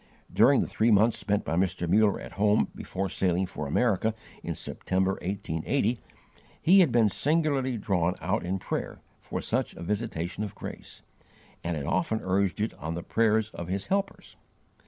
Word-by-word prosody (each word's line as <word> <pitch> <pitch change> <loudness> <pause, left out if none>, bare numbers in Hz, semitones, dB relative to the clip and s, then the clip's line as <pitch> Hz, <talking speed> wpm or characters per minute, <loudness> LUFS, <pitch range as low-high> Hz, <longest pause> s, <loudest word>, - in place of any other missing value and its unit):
During - - +5
the - - -1
three 115 - +1
months 110 +2 +4
spent 105 -1 0
by 80 - -1
Mr. 90 -1 0
Muller 105 +3 +3
at - - -9
home 105 +4 +2
before 95 +1 -4
sailing 95 0 0
for 80 -5 -5
America 110 - +1 0.3
in - - -4
September, 95 +1 -1
1880, 100 - -1 0.6
he 190 +4 +6
had 170 -8 +5
been 115 -2 +4
singularly 140 - +1
drawn 90 -4 0
out - - -1
in 90 +2 -1
prayer - - -4 0.2
for - - -4
such - - -1
a - - -8
visitation 100 -2 -3
of 105 - -6
grace, - - -9 0.6
and 85 -1 -2
had 70 - -4
often 95 +7 0
urged 95 +1 0
it 110 +2 -1
on 80 +3 -4
the 85 - -5
prayers 110 -1 +1
of 85 - -7
his 95 +2 -3
helpers. 200 0 -3
100 Hz, 170 wpm, -28 LUFS, 90-110 Hz, 0.6 s, he